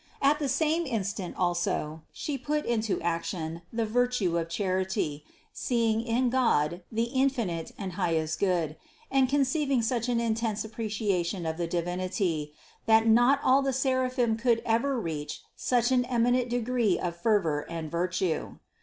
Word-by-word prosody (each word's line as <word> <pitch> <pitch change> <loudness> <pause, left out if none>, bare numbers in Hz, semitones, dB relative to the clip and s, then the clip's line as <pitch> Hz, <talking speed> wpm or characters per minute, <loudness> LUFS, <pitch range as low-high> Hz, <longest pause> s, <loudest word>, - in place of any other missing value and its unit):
At 285 +2 +3
the 285 -3 -1
same 315 +4 +1
instant 200 -6 -3
also 175 -3 -1
She 295 - -4
put 295 +3 -2
into 220 -3 0
action 170 -1 -2
the 230 -1 -1
virtue 235 -5 +1
of 165 0 -4
charity, 185 -4 -1 0.3
seeing 230 -3 +1
in 240 +1 +1
God 175 - +2
the 225 +1 +1
infinite 235 - 0
and 195 -3 -4
highest 165 -4 -1
Good, 170 -6 0 0.3
and 265 -2 +3
conceiving 275 -2 +1
such 235 +1 0
an 240 -1 +2
intense 225 -2 -1
ap 220 - -9
preciation 200 -6 -1
of 160 0 -2
the 170 -1 -1
Divinity, 175 -2 -1 0.4
that 220 0 +5
not 240 +5 +5
all 265 +2 +5
the 270 -1 0
seraphim 255 -3 +1
could 230 -1 +2
ever 235 +4 +1
reach 155 -7 -5
such 245 0 +1
an 250 -1 +4
eminent 245 0 +2
degree 240 -4 +1
of 175 -1 -3
fervor 170 -6 +1
and 165 -2 -5
virtue. 175 -1 -1
220 Hz, 150 wpm, -28 LUFS, 175-250 Hz, 0.4 s, that